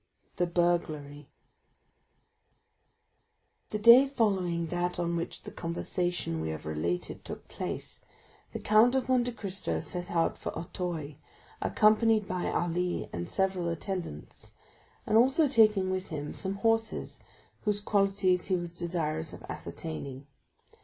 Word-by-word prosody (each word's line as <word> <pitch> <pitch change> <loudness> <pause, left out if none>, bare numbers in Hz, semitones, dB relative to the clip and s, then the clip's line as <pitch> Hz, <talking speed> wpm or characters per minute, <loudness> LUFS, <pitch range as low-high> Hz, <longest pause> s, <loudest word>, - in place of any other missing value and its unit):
The 175 - +2
Burglary 155 -5 -1 2.4
The 210 - -2
day 235 +5 +8
following 190 -10 +1
that 175 +1 -1
on 170 -1 -1
which 170 0 -4
the - - -8
conversation 170 - -2
we 80 - -2
have 80 -1 -5
related 80 +3 -3
took - - -8
place, - - -5 0.5
the - - -4
Count 220 +4 +4
of 260 -1 0
Monte 245 -1 +3
Cristo 200 -4 -3
set 180 -1 -4
out 165 -1 +1
for - - -5
Auteuil, 165 -5 -4 0.4
accompanied 215 -1 +4
by 180 -1 -2
Ali 175 +1 -1
and 85 0 -4
several 190 -3 +1
attendants, 170 - -5 0.5
and 220 - +4
also 270 +6 +4
taking 215 -7 +4
with 185 0 -2
him 150 -3 -5
some 190 0 -2
horses 225 +2 0 0.5
whose 210 -1 +2
qualities 195 -3 +2
he 190 - +1
was 175 -1 -4
desirous 165 -3 -2
of - - -10
ascertaining. 130 - -6
180 Hz, 125 wpm, -30 LUFS, 165-210 Hz, 2.4 s, day